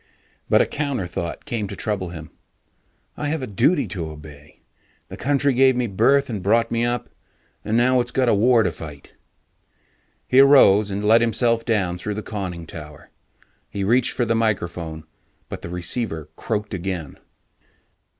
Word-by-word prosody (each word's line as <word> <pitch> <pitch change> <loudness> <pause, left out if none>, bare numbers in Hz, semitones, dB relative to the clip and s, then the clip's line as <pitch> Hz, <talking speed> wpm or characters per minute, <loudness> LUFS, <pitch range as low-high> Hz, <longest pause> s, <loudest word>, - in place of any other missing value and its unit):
But - - +5
a - - -2
counter 140 -9 -3
thought 85 -1 -5
came 115 -7 -3
to 100 - -7
trouble 95 -4 -3
him: 80 -2 -9 0.8
I 145 - -3
have 150 -1 -2
a - - -1
duty 130 - +1
to 85 -6 -5
obey; 75 -1 -13 0.5
The - - -7
country 140 0 +1
gave 130 +1 +4
me 125 0 0
birth 120 +7 +2
and 110 -5 -4
brought 115 +4 +2
me 115 0 0
up, 120 -1 -1 0.6
and 110 +2 0
now 125 +1 +3
it's - - -4
got 130 -1 0
a 115 - +4
war 115 +3 +4
to - - 0
fight. 75 -3 -11 1.2
He 130 - +4
arose 110 -7 +6
and 100 +1 -3
let 110 +2 +5
himself 115 0 +1
down 95 -7 0
through 105 +3 -4
the 110 - -5
conning 90 -5 -5
tower. 75 -1 -11 0.6
He 100 - -4
reached 120 +5 +2
for 120 - 0
the 115 - +1
microphone, 85 -8 -2 0.5
but - - -7
the - - -7
receiver 85 - -3
croaked 105 -2 -3
again. 90 -5 -5
105 Hz, 170 wpm, -22 LUFS, 90-120 Hz, 1.2 s, arose